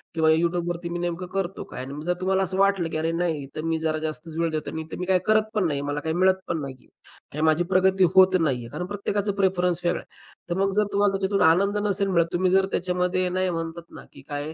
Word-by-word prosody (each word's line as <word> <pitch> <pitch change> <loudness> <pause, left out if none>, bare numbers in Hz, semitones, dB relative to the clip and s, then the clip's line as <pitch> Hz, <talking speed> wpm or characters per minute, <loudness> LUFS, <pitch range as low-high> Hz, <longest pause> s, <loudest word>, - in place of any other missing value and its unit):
किंवा 160 -1 +3
YouTubeवरती 170 +1 0
मी 175 0 -3
नेमकं 175 +1 -3
करतो 195 -1 -2
काय? 125 - -8
आणि 135 - -8
मग 150 +1 -7
जर 180 - +1
तुम्हाला 190 +1 +2
असं 185 +1 -2
वाटलं, 195 -4 +2
की 155 - -3
अरे, 160 +1 0
नाही 165 -4 -1
तर 155 - -3
मी 160 - 0
जरा 160 -1 0
जास्तच 155 +1 -6
वेळ 165 -1 +1
देतो 155 -1 -3
आणि 160 - -4
तर - - -5
मी 180 - -2
काही 185 0 +3
करत 215 0 +3
पण 205 -4 +2
नाहीये. 140 -2 -2
मला 145 +1 -2
काही 160 +2 -3
मिळत 190 +1 +3
पण 165 -2 -2
नाही 135 -2 -6
आहे - - -24 0.5
आणि 150 - -3
माझी 160 +2 +3
प्रगती 190 0 +4
होत 185 0 +7
नाही 140 -6 +1
आहे. 115 - -8
कारण 170 +4 -4
प्रत्येकाचा 205 0 -2
प्रेफरन्स 180 -2 +1
वेगळा 175 - +1
आहे. - - -25 0.3
तर 175 +2 -1
मग 195 0 +2
जर 210 - +4
तुम्हाला 200 0 +3
त्याच्यातून 195 +1 0
आनंद 200 +5 +2
नसेल, 195 -3 +2
तुम्ही 180 +1 +2
जर 190 0 +4
त्याच्यामध्ये 180 0 0
नाही 185 0 0
म्हणतात 165 0 -5
ना, - - -11
की 140 - -13
काय? 145 +2 -4
175 Hz, 250 wpm, -25 LUFS, 160-190 Hz, 0.5 s, होत